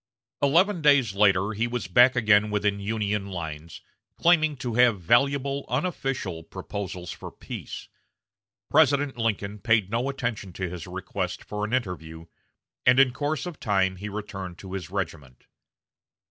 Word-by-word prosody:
Eleven 170 +6 +3
days 140 -8 +4
later 100 0 +3
he 115 +3 0
was 120 0 -3
back 125 +8 +6
again 105 -3 +4
within 105 -1 0
Union 105 -1 -2
lines, 80 -3 -7 0.4
claiming 155 -4 +3
to 120 -2 -4
have 120 -3 +4
valuable 140 +8 +2
"unofficial" 130 - -2
proposals 90 0 -6
for - - -8
peace. - - -8 0.8
President 145 -2 +3
Lincoln 105 -3 -2
paid 105 -1 +2
no 120 +4 0
attention 115 -8 -4
to 95 +1 -3
his 85 -3 -7
request - - -4
for 105 0 -5
an 105 - -3
interview, 85 -9 -3 0.6
and 125 +1 +5
in 130 -2 +5
course 150 +3 -2
of 175 -4 -7
time 95 -3 +1
he 105 +3 -6
returned 95 -4 -6
to 95 0 -9
his 90 -4 -5
regiment. 80 -9 -5
105 Hz, 145 wpm, -26 LUFS, 95-130 Hz, 0.8 s, back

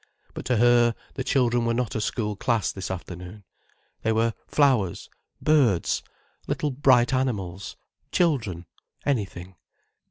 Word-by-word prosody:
But - - -7
to 125 - +1
her, 120 0 +4 0.2
the 130 - -3
children 120 -3 +2
were 115 0 +1
not 125 -2 -1
a 110 - -2
school 105 -1 -2
class 115 +1 0
this 95 - -6
afternoon. 90 +2 -7 0.6
They 110 - +1
were 115 +1 +2
flowers, 130 - +1 0.3
birds, 130 - +2 0.5
little 150 - -1
bright 130 -2 +4
animals, 100 -8 -2 0.4
children, 110 - 0 0.4
anything. 95 -8 -2
115 Hz, 125 wpm, -25 LUFS, 95-130 Hz, 0.6 s, her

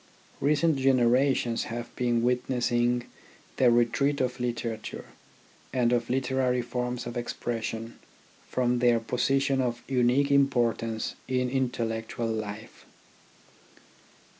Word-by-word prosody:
Recent 150 +2 +2
generations 130 -2 +2
have 120 +1 -6
been 120 -2 +1
witnessing 120 -1 +1 0.5
the 125 - +5
retreat 120 +4 +2
of 125 0 -1
literature, 115 -2 -4 0.7
and 125 -2 +2
of 120 -1 0
literary 130 -1 +1
forms 125 0 -3
of 120 0 -6
expression, 115 -1 -4 0.5
from 125 -1 +1
their 120 -1 +4
position 135 +4 +1
of 120 -1 -2
unique 130 +2 +2
importance 120 -5 +1
in 125 -1 0
intellectual 115 -3 -2
life. 110 -1 -5
125 Hz, 100 wpm, -27 LUFS, 120-130 Hz, 0.7 s, the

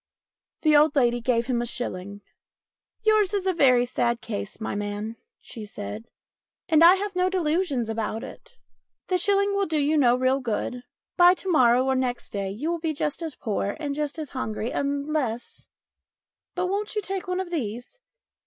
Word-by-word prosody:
The 305 -2 +5
old 295 0 +5
lady 240 -3 +2
gave 235 -1 +1
him 245 -1 0
a 240 - -3
shilling. 200 -4 -5 0.4
" - - -58
Yours 430 -2 +3
is 390 -2 -1
a 265 -10 +4
sad 235 -1 0
case, 215 -3 -6
my 225 - -3
man," 205 +2 -4 0.2
she 225 - -9
said, 105 - -7 0.3
" - - -69
and 320 -2 +5
I 350 +2 +9
have 400 0 -4
no 365 0 +2
delusions 325 -8 0
about 225 0 -3
it. - - -11 0.6
The 365 -1 +2
shilling 400 +2 +2
will 400 -1 +1
do 315 - 0
you 300 +2 +2
no 245 -3 +5
real 255 +1 +2
good; 245 0 -3 0.4
by 355 0 +7
to 375 0 -3
morrow 250 -4 +4
or 265 - +2
next 250 -2 -2
day 200 -1 -3
you 260 - -3
will 340 - -2
be 320 -1 -1
just 295 +2 -2
as 320 -5 -5
poor 205 -3 -2
and 290 -3 -3
just 295 +1 -3
as 310 -3 -6
hungry 220 -3 -3
unless 280 -4 -2 0.9
But 360 -1 0
won't 405 +3 -2
you 425 - -1
take 385 -1 -4
one 365 0 -1
of 370 -2 -4
these 245 - -4
280 Hz, 185 wpm, -25 LUFS, 235-350 Hz, 0.9 s, I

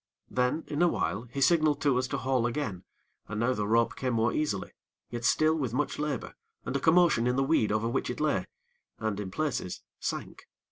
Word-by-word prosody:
Then, 125 +5 +1
in 150 +2 -2
a 175 - +6
while 115 -7 -1
he 140 - -3
signaled 155 -1 +4
to 140 -4 +3
us 130 - -1
to - - -2
haul 130 -2 +1
again, 115 -8 -3 0.4
and 105 - -4
now 120 +3 +2
the 105 -4 -2
rope 115 +2 +2
came 130 -2 -1
more 115 +1 +2
easily; 105 -11 -1 0.4
yet 120 0 -4
still 155 +5 +4
with 130 -7 -2
much 150 +2 -1
labor, 150 -5 -3 0.3
and - - -3
a - - +2
commotion 160 -6 +4
in 125 - +2
the 135 - +2
weed 135 -7 +2
over 110 +2 +1
which 120 - -1
it - - -4
lay - - +1 0.5
and, 110 -2 -2
in 100 -2 -4
places, 130 -5 -3 0.2
sank. - - -5
125 Hz, 205 wpm, -29 LUFS, 115-150 Hz, 0.5 s, a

